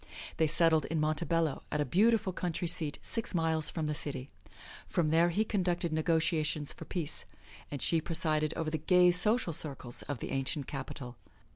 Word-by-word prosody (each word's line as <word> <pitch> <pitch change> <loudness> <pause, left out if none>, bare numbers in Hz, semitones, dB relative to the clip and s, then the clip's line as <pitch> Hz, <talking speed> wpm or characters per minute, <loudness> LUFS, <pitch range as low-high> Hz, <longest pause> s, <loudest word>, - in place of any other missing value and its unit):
They 160 - +3
settled 160 -1 +3
in 160 0 -2
Montebello, 155 0 0
at 150 - -1
a 145 - +1
beautiful 210 - +2
country 175 0 -3
seat, 160 -3 +2
six 225 -4 -1
miles 160 -2 +3
from 160 -2 -3
the 150 - -1
city. 140 -3 -4 0.6
From 160 -3 0
there 165 +2 +4
he 210 +6 0
conducted 175 -5 -1
negotiations 155 -2 0
for - - -10
peace 165 -5 -4 0.4
and 145 - -4
she 165 -1 +2
presided 155 -2 +1
over 160 -1 -2
the 160 - -2
gay 180 +2 +5
social 210 +1 +3
circles 135 -5 -3
of 145 - -5
the - - -6
ancient 135 +1 -1
capital. 130 -3 -7
160 Hz, 170 wpm, -31 LUFS, 150-175 Hz, 0.6 s, gay